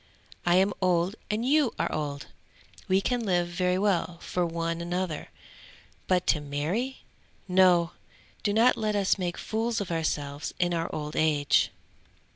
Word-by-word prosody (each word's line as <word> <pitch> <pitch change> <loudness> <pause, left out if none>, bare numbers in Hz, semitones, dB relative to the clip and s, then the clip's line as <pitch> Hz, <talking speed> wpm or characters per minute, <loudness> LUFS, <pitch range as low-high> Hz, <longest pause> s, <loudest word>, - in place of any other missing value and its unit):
I 175 - +5
am 190 +2 +4
old 180 +1 +2
and 215 +3 -1
you 285 -2 +3
are - - -1
old! 145 -2 -3 0.6
We 190 +1 +3
can 245 +3 0
live 175 -4 +1
very 180 +1 0
well 180 -4 0
for 175 +1 -2
one 165 0 -2
another, 175 -2 -3 0.8
but 180 -1 +2
to 155 - +2
marry? 160 - -3 0.4
No! 180 -2 +4 0.5
Do 205 - 0
not 230 +4 +4
let 215 -1 -1
us 200 -1 +2
make 175 -2 -2
fools 225 +1 -1
of 200 -4 -4
ourselves 150 -3 -2
in 175 -1 +1
our 165 0 -1
old 150 0 -5
age." 150 -2 +3
180 Hz, 150 wpm, -28 LUFS, 165-205 Hz, 0.8 s, I